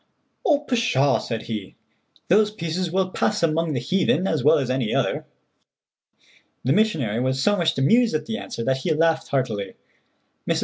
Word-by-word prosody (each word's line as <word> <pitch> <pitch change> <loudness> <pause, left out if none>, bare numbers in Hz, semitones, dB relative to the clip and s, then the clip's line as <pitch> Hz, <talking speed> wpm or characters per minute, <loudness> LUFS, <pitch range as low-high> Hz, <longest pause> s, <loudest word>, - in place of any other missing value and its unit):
"Oh, 295 -5 +3
pshaw," 230 - +1
said 115 -2 -5
he, 105 -4 -6 0.5
"those 210 +4 +4
pieces 175 -3 -3
will 185 0 0
pass 210 -1 0
among 165 0 +1
the 125 - -1
heathen 185 +7 +1
as 160 -9 0
well 155 +3 +5
as 130 -3 -1
any 130 -4 -1
other." - - -1 1.4
The 130 - +2
missionary 155 - +1
was 130 +1 0
so 205 - +3
much 170 -7 0
amused 225 - +3
at 155 - -2
the 225 0 -4
answer 115 - -6
that 130 +2 +1
he 155 +4 -1
laughed 165 0 +1
heartily. 110 -8 -2 0.7
Mrs. - - +2
160 Hz, 170 wpm, -23 LUFS, 130-190 Hz, 1.4 s, well